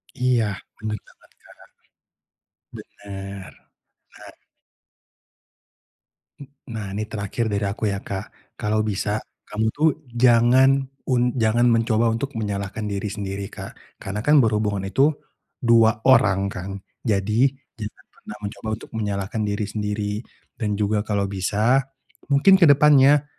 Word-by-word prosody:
Iya, 125 -3 +2 0.4
bener 105 0 -3
banget, - - -23
Kak. - - -18 1.5
Bener, 100 -1 -8 0.6
bener. - - -14 2.1
Mmm, 140 -1 -15
nah, 110 -2 -4
ini 105 +2 -2
terakhir 110 +2 -3
dari 100 0 -1
aku 105 +2 -1
ya, 100 - -2
Kak, 95 -1 -8
kalau 110 0 0
bisa 105 0 -1 0.3
kamu 110 +1 -1
tuh 155 +2 +3 0.2
jangan 120 +2 +5 0.4
un 125 -1 +2
jangan 115 +2 +3
mencoba 115 0 +2
untuk 135 +5 -4
menyalahkan 105 0 -3
diri 100 0 -3
sendiri, 100 -1 -5
Kak, - - -8 0.3
karena 100 +2 -5
kan 150 +6 +4
berhubungan 105 -3 0
itu 135 +10 +3 0.5
2 115 -2 +4
orang 105 -7 +5
kan? 95 +1 -6 0.3
Jadi 110 +4 +2 0.2
jangan 105 -2 -9
pernah 105 - -11
mencoba 105 +2 -7
untuk - - -13
menyalahkan 105 0 -3
diri 100 +1 -1
sendiri 105 0 -3 0.4
dan 105 -3 -2
juga 105 0 +1
kalau 105 -1 -1
bisa 105 +7 +1 0.5
mungkin 145 +8 +5
ke - - +8
depannya 145 0 +6
110 Hz, 125 wpm, -23 LUFS, 100-120 Hz, 2.1 s, ke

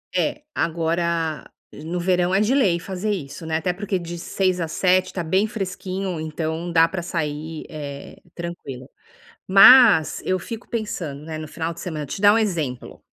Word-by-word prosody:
É, 300 - 0
agora 165 -1 -1 0.2
no 165 +4 -5
verão 180 0 +1
é 195 - +4
de 215 +5 +2
lei 190 -11 +3
fazer 190 +4 -3
isso, 160 -4 -5
né, 160 0 0
até 175 +3 -1
porque 195 0 -2
de 175 0 -6
6 185 +1 -1
às 165 -1 -3
7 185 +2 +2
tá 180 - -2
bem 190 +6 +1
fresquinho 190 -3 -4
então 160 +2 -3
dá 165 0 +5
para 175 +1 -4
sair, 160 -2 -4
eh, 145 -2 -8 0.2
tranquilo. 145 -7 -7 0.6
Mas 195 - +7
eu 185 0 +1
fico 225 +5 -8
pensando, 170 -11 -4
né, 155 0 -6
no 155 - -6
final 165 +2 -4
de 170 - -13
semana, 155 -6 -4
vou - - -7
te - - -7
dar 205 0 +7
um 225 - +3
exemplo. 160 - -3
170 Hz, 180 wpm, -22 LUFS, 160-190 Hz, 0.6 s, Mas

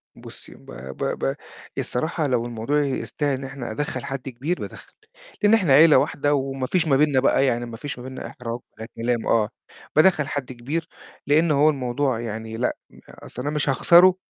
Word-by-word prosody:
بُصّي - - -10
ب - - -19 0.3
ب - - -4 0.2
ب 70 - -1 0.4
الصراحة 155 +4 -1
لو 120 -2 0
الموضوع 120 +6 0
يستاهل 140 +1 -2
إن 135 - -8
إحنا 135 -4 -6
أدَخّل 150 +7 -3
حد 135 0 -5
كبير، 145 +9 -3
بادَخّل، - - -9 0.5
لإن 205 +2 +5
إحنا 185 -11 +4
عيلة 155 +2 +8
واحدة 145 +1 +1
وما 135 -2 -1
فيش 170 0 +1
ما 135 -2 +4
بيننا 145 -3 +3
بقى 135 +1 +3
يعني 120 -1 0
ما 115 -1 -8
فيش 145 +1 -6
ما - - -8
بيننا 130 0 -7
إحراج، 120 -1 -6 0.2
ده 110 - -6
كلام 120 0 -1
آه، 110 -2 +3 0.5
بادَخّل 155 -3 +4
حد 135 -3 -4
كبير 145 +7 -4 0.4
لإن 155 +2 +4
هو 150 +2 +5
الموضوع 130 -2 -1
يعني 110 -1 -5
لأ، 125 - 0 0.3
أصل 125 - -9
أنا 145 +3 -2
مش 150 -2 0
هاخسره 175 +6 +6
135 Hz, 185 wpm, -23 LUFS, 120-150 Hz, 0.5 s, عيلة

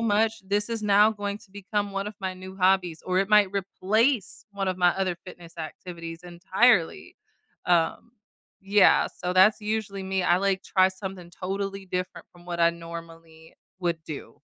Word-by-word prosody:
much, 225 0 +1
this 205 +3 0
is 225 -2 -2
now 210 +1 +5
going 205 -1 -4
to 210 -3 -19
become 205 +1 -3
one 195 +1 -3
of 210 - -6
my 190 -1 -2
new 185 +1 -10
hobbies," 185 -3 +2
or 185 0 0
it 195 0 +1
might 210 -2 +6
replace 200 +4 0
one 200 -1 -3
of 185 -1 -2
my 180 -1 +5
other 190 -2 0
fitness 170 -2 -12
activities 165 +1 -7
entirely. 180 - +1 0.5
Um, 175 +7 +1 0.5
yeah, 200 0 +5
so 180 0 -4
that's 190 +4 +5
usually 210 -2 -3
me, 190 -1 -1
I, 175 0 +4
like, 195 0 0
try 185 0 +3
something 190 -2 -8
totally 195 +2 -4
different 180 0 -4
from 175 0 -18
what 170 -1 -4
I 170 0 +5
normally 165 -1 -11 0.3
would 170 -2 -1
do. 155 -2 -8
190 Hz, 170 wpm, -26 LUFS, 175-205 Hz, 0.5 s, might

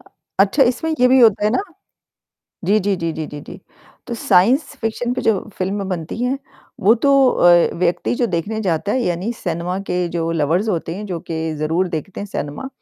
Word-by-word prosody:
अ, - - -24 0.3
अच्छा, 205 +8 +4
इसमें 290 +6 +1
ये 250 - +6
भी 260 +1 +5
होता 215 -3 +5
है 210 - +3
ना 255 - +1 1.0
जी, 205 +4 +3
जी, 200 0 0
जी, 165 -2 -2
जी, 155 0 -4
जी, 145 - -8
जी। - - -11 0.5
तो 240 - -4
साइंस 230 - +3 0.2
फिक्शन 235 +2 -2
पे - - -3
जो 215 -4 +2 0.2
फ़िल्में 195 +1 -2
बनती 170 +1 -4
हैं 255 +2 0 0.4
वो 205 +4 +6
तो 280 - +5 0.2
अ, 175 -6 +4
व्यक्ति 175 +5 0
जो 240 - +1
देखने 190 +6 -2
जाता 185 0 -1
है 255 - +1
यानी 180 +2 -1
सिनेमा 175 -2 -3
के 180 0 0
जो 165 -1 -2
लवर्स 165 +7 +1
होते 170 -2 -2
हैं, 210 - -6
जो 180 -4 -4
कि 160 -1 -4
ज़रूर 160 +5 0
देखते 170 +3 -5
हैं 205 - -6
सिनेमा, 145 - -5
190 Hz, 200 wpm, -19 LUFS, 170-225 Hz, 1.0 s, ये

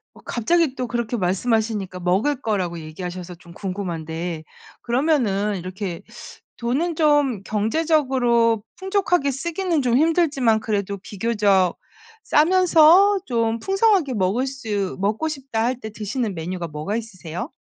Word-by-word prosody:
어 - - -16
갑자기 300 +4 +1
또 250 -2 -4
그렇게 235 0 -2
말씀하시니까 200 0 -1
먹을 205 +11 +1
거라고 180 -6 -1
얘기하셔서 175 +2 -7
좀 170 0 -16
궁금한데 170 -4 -4 0.4
그러면은 235 -7 +1
이렇게 185 0 -5 0.5
돈은 290 +8 -1
좀 290 - +2
경제적으로 235 -2 +1
풍족하게 375 -6 +1
쓰기는 335 +3 -1
좀 245 -1 +2
힘들지만 300 -8 +3
그래도 200 -2 -2
비교적 200 -3 +1 0.5
싸면서 365 +4 +5
좀 230 -1 0
풍성하게 390 - +2
먹을 210 +7 +1
수 215 -8 -3
먹고 215 +11 0
싶다 270 -7 -3
할 250 0 0
때 220 - -6
드시는 215 0 -3
메뉴가 175 +1 -4
뭐가 155 +8 -3
있으세요? 185 -7 -6
225 Hz, 310 characters per minute, -22 LUFS, 190-285 Hz, 0.5 s, 싸면서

